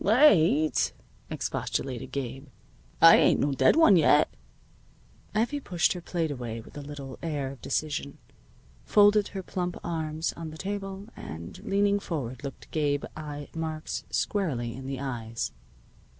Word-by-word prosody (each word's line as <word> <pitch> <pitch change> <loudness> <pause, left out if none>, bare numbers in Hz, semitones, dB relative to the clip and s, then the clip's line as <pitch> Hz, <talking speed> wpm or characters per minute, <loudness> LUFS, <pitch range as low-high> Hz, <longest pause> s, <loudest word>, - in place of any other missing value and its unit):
"Late!" 180 - +4 0.4
expostulated 130 -1 -3
Gabe. 135 +1 -5 0.6
"I - - +10
ain't - - +4
no 145 - +2
dead 135 - +4
one 310 - +7
yet." 150 -2 +4 1.0
Effie 240 +7 +1
pushed 175 -10 +1
her 180 - -7
plate 165 -2 -2
away 120 -4 -5
with 110 - -13
a 145 - -6
little 140 -2 -8
air 145 -5 -2
of 135 - -12
decision, 145 -2 -2 0.7
folded 205 - +5
her 195 -2 -6
plump 180 -1 -3
arms 160 -1 -2
on 165 -1 -6
the 155 - -10
table, 195 +1 -5
and, 85 - -8
leaning 200 -1 +2
forward, 130 -10 -4
looked 140 -2 -8
Gabe 145 -2 0
I. 145 -2 -7
Marks 160 -1 -4
squarely 130 - -1
in 130 0 -8
the 135 -1 -4
eyes. 115 -4 -3
155 Hz, 140 wpm, -28 LUFS, 135-185 Hz, 1.0 s, I